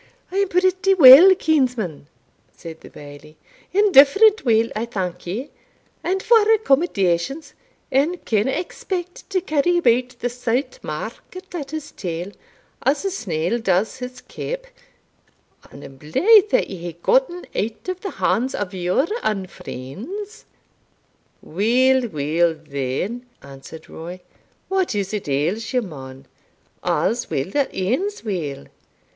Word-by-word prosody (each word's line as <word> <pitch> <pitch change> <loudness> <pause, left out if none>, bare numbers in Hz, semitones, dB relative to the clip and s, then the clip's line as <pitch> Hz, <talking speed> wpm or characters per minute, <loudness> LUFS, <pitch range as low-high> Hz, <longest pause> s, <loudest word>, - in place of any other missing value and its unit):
"I 380 - -3
am 400 0 +2
pretty 370 +1 +2
weel, 325 +5 +10
kinsman," 250 - -1 0.4
said 165 -1 -11
the - - -13
Bailie 145 +1 -13 0.3
"indifferent 405 +3 +5
weel, 230 -1 +2
I 220 +2 -2
thank 180 -6 -5
ye; 235 +11 -5 0.5
and 380 +2 -1
for 465 -1 +6
accommodations, 275 - +1 0.4
ane 300 +7 +1
canna 215 +2 +1
expect 355 +4 -5
to 385 -2 +1
carry 345 +1 +1
about 250 -4 +1
the 245 - -2
Saut 245 - -2
Market 370 0 -8
at 295 -6 -5
his 310 -1 -6
tail, 175 0 -5 0.5
as 285 +7 0
a 390 - 0
snail 180 - -2
does 200 +3 0
his 250 -1 -8
caup; - - -6 1.0
and - - -13
I - - -9
am 135 - -13
blythe 405 - +4
that - - +2
ye 190 - -6
hae 170 -1 -7
gotten - - +1
out 220 - -3
o' 370 - 0
the 375 +2 -7
hands 255 +4 0
o' 205 - -2
your 185 - 0 0.2
unfreends." 215 - -6 1.0
"Weel, 245 +8 +2
weel, 160 0 0
then," 150 - -4 0.2
answered 140 +3 -12
Roy, 175 +3 -9 0.5
"what 380 - 0
is't 200 -3 -3
ails 175 - -1
ye, 250 - +3
man 135 - -9 0.6
a's 240 +2 0
weel 135 +7 -2
that 280 +2 0
ends 265 - -2
weel! 160 - -4
240 Hz, 130 wpm, -21 LUFS, -, 1.0 s, weel